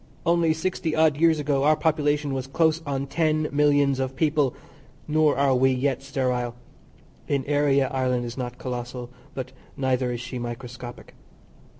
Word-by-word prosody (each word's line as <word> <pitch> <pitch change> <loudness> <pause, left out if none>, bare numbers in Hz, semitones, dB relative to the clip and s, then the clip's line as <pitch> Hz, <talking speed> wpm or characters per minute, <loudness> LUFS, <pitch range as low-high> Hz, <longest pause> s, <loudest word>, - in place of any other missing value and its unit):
Only 170 -1 +3
sixty 160 0 -1
odd 155 -2 +4
years 165 0 +4
ago 145 -2 0
our 155 +1 +5
population 150 -2 +1
was 130 -1 -3
close 160 +3 +2
on 140 -1 -1
ten 155 0 +1
millions 145 -2 +3
of 130 0 -2
people, 145 -2 +1 0.5
nor 155 -2 +3
are 140 -1 +3
we 130 +1 +4
yet 130 0 0
sterile; 125 -3 -1 0.7
in 140 -2 0
area 140 -2 +2
Ireland 125 -2 0
is 120 0 -6
not 125 -2 -5
collossal, 125 -1 -5 0.2
but 130 -1 -5 0.3
neither 130 -2 0
is 120 - -3
she 125 +1 -6
microscopic. 120 +1 -7
135 Hz, 155 wpm, -25 LUFS, 125-150 Hz, 0.7 s, our